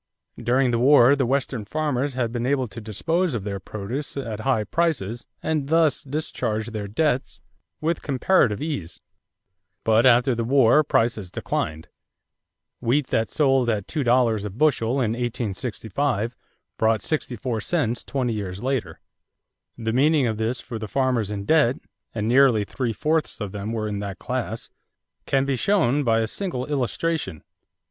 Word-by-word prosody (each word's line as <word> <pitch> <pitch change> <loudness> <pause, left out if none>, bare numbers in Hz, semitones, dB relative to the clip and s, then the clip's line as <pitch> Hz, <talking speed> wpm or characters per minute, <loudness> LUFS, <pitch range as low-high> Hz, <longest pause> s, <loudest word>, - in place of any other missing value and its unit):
During 125 +2 +2
the 115 - +1
war, 135 0 +6
the 135 -3 0
Western 130 -3 -1
farmers 145 +1 -1
had 120 -3 -1
been 120 +1 -2
able 135 -2 +1
to 115 +1 -9
dispose 160 - -1
of 105 - -3
their 100 -1 -4
produce 110 +10 -5
at 115 -6 -4
high 110 -2 +1
prices 120 - -1 0.2
and 155 -3 -1
thus 160 -2 +3
discharge 120 -6 -3
their 105 -2 -4
debts 125 - -1 0.4
with 165 +1 0
comparative 130 - +2
ease; 125 - -4 0.8
but 115 +3 +4
after 125 +1 +5
the 115 0 -1
war 135 +3 +5
prices 115 -8 0
declined. 80 -2 -3 0.9
Wheat 130 +4 +1
that 115 0 +1
sold 135 -5 +2
at 105 -4 -1
two 150 - -2
dollars 120 -4 +3
a 105 - -3
bushel 120 0 +1
in 130 -5 +1
1865 120 0 -2 0.4
brought 110 -2 +2
sixty 150 -5 -2
four 115 -1 -3
cents 120 -5 0
twenty 125 -4 -1
years 100 -2 -5
later. 130 -2 -2 0.8
The 110 -1 -2
meaning 145 +2 +3
of 110 -2 -1
this 115 +3 -1
for 115 -3 -7
the 110 - -5
farmers 125 -3 0
in 100 -1 -4
debt 150 -4 +4 0.4
and 105 -1 -2
nearly 125 -3 +5
three 120 +3 -3
fourths 155 +8 -1
of 105 -3 -4
them 105 +1 -4
were 110 -2 -2
in 105 -1 -3
that 100 -2 -5
class - - -4 0.6
can 135 0 +2
be 140 -1 0
shown 145 - +2
by 115 -2 +2
a 110 - 0
single 130 - -3
illustration. 140 - -2
120 Hz, 160 wpm, -24 LUFS, 110-140 Hz, 0.9 s, war